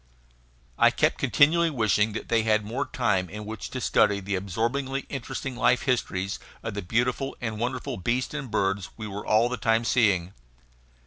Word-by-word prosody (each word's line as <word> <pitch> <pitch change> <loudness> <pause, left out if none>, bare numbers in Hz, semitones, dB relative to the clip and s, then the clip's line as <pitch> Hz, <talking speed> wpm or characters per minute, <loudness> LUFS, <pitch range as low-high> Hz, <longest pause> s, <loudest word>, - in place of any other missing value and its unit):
I - - +7
kept - - +1
continually 165 +3 +4
wishing 110 -5 +1
that - - -5
they 115 -1 +2
had 110 -1 +1
more 125 +7 -3
time 95 -8 0
in 105 +3 -7
which 110 -1 -6
to 130 - -5
study 105 -4 +3
the 100 +1 -4
absorbingly 120 +9 -1
interesting 135 0 -5
life 125 0 +2
histories 100 -7 -1 0.2
of 110 - -4
the 105 - -3
beautiful 125 +7 -1
and 110 -3 -4
wonderful 125 +1 -3
beasts 120 +9 -1
and 140 -4 -5
birds 100 -3 0
we 110 - -6
were 105 0 -6
all 110 +2 +4
the 125 +1 -3
time 115 +2 +1
seeing. 100 -7 +2
115 Hz, 175 wpm, -26 LUFS, 105-125 Hz, 0.2 s, I